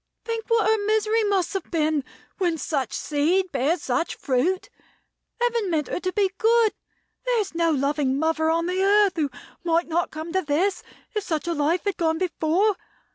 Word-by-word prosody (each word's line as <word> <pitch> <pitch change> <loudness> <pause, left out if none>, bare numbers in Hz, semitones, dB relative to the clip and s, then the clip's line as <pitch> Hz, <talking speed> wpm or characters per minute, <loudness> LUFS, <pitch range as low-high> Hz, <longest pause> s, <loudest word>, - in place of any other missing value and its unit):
Think 455 -1 -3
what 460 -2 +3
her 440 -1 +2
misery 435 +1 +2
must 395 -3 +1
have 390 -3 -4
been, 310 -3 +1 0.4
when 345 -4 +1
such 275 -6 -2
seed 340 +6 0
bears 295 +5 0
such 255 +6 -1
fruit. 315 +8 0 0.7
Heaven 470 -4 +1
meant 310 -4 0
her - - -2
to 370 0 -2
be 390 -1 +1
good. 455 -1 +4 0.5
There - - +2
is 400 -4 -2
no 335 0 +2
loving 280 -2 +1
mother 320 +1 +1
on 335 +1 +1
the 365 +2 -1
earth 405 0 +4
who 300 -3 +1 0.3
might 335 0 +1
not 335 +1 0
come 315 +2 -7
to 375 - +2
this, 350 +5 0 0.3
if 425 -2 -1
such 320 -2 -2
a 340 - +1
life 320 +3 +1
had 405 -3 -1
gone 320 -1 +1
before. 365 +3 +1
345 Hz, 185 wpm, -24 LUFS, 315-405 Hz, 0.7 s, good